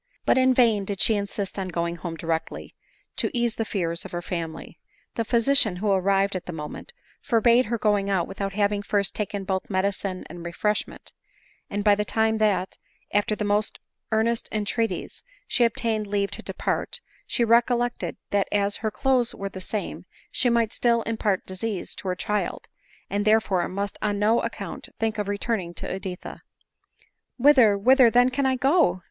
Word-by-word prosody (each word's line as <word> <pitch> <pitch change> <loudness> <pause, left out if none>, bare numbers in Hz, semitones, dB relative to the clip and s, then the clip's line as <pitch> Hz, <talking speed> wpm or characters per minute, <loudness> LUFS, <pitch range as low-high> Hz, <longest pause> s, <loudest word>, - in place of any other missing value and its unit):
But - - +4
in 260 0 +5
vain 225 -5 +4
did 195 -1 -4
she 225 - +4
insist 200 0 -3
on 190 - -2
going 170 -1 -2
home 165 +1 -5
directly, 160 0 -3 0.4
to - - +1
ease 235 -1 +1
the 225 - -2
fears 170 -5 -2
of - - -10
her 175 - -2
family. 165 -3 -5 0.3
The 230 - -1
physician, 230 -2 +3
who 200 +3 0
arrived 195 +1 +2
at 185 - -5
the - - -3
moment, 155 - -7 0.3
forbade 235 +2 +4
her 235 +2 -1
going 205 -2 +1
out 185 -4 +1
without 195 0 -4
having 205 0 +1
first 200 -1 0
taken 200 -1 -3
both 190 0 -2
medicine 190 -1 -1
and 175 +1 -9
refreshment; 210 +5 -2 0.6
and 205 0 -2
by 205 -1 +6
the 210 +1 +1
time 220 +1 +1
that, 205 -3 +1 0.3
after 205 +1 +2
the 210 - -3
most 205 +1 0 0.3
earnest 225 +1 +1
entreaties, 220 +2 -2 0.3
she 240 - +3
obtained 220 -2 0
leave 200 0 0
to - - -1
depart, - - -3 0.3
she 240 - +1
recollected, 240 +1 +2
that 200 -1 +2
as 205 0 +1
her 220 - -1
clothes 245 +4 +1
were 195 0 -4
the 190 - -8
same, 205 +2 -4 0.3
she 245 - +2
might 230 -2 +2
still 235 -1 +2
impart 215 -4 -1
disease 190 +1 -4
to - - -8
her 180 - 0
child, 210 +3 -2 0.4
and 205 +1 0
therefore 210 -5 +2
must 200 +1 -4
on 205 -1 0
no 215 +3 +3
account - - -6
think 220 -1 -1
of 205 - -2
returning 200 -4 -2
to - - -4
Edi 190 -1 -5
tha. - - -10 0.5
" - - -38
Whither, 250 -6 +6
whither 255 +4 +6
then 245 +2 +4
can 270 +1 +1
I 260 - +2
go?" 265 - +3
205 Hz, 180 wpm, -25 LUFS, 195-230 Hz, 0.6 s, by